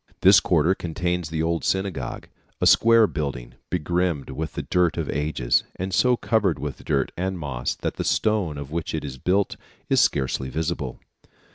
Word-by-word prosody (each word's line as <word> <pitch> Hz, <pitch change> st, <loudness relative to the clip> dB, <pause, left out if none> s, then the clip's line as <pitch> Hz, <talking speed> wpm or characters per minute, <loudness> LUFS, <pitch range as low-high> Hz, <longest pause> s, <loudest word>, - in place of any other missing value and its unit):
This 95 Hz, -1 st, +8 dB
quarter 85 Hz, 0 st, +2 dB
contains 90 Hz, -1 st, -2 dB
the 80 Hz, 0 st, -1 dB
old 85 Hz, -3 st, 0 dB
synagogue, 95 Hz, -10 st, -2 dB, 0.3 s
a -, -, +1 dB
square 115 Hz, 0 st, +6 dB
building 70 Hz, -, -4 dB, 0.2 s
begrimed 85 Hz, -3 st, -1 dB
with 75 Hz, +3 st, -4 dB
the -, -, -4 dB
dirt 90 Hz, -2 st, +1 dB
of 80 Hz, -4 st, -2 dB
ages, 75 Hz, -4 st, +1 dB
and 95 Hz, +1 st, -4 dB
so 125 Hz, +4 st, +3 dB
covered 100 Hz, -11 st, +1 dB
with 75 Hz, -2 st, -6 dB
dirt 70 Hz, -, 0 dB
and 95 Hz, +1 st, -2 dB
moss 70 Hz, -6 st, -3 dB
that -, -, -4 dB
the -, -, -1 dB
stone 100 Hz, -9 st, +1 dB
of 70 Hz, 0 st, -7 dB
which 80 Hz, 0 st, -3 dB
it 75 Hz, -, -3 dB
is 65 Hz, -2 st, -7 dB
built 95 Hz, +7 st, +1 dB, 0.3 s
is -, -, +4 dB
scarcely 65 Hz, -1 st, 0 dB
visible. 80 Hz, -2 st, -3 dB
80 Hz, 170 wpm, -24 LUFS, 70-90 Hz, 0.3 s, This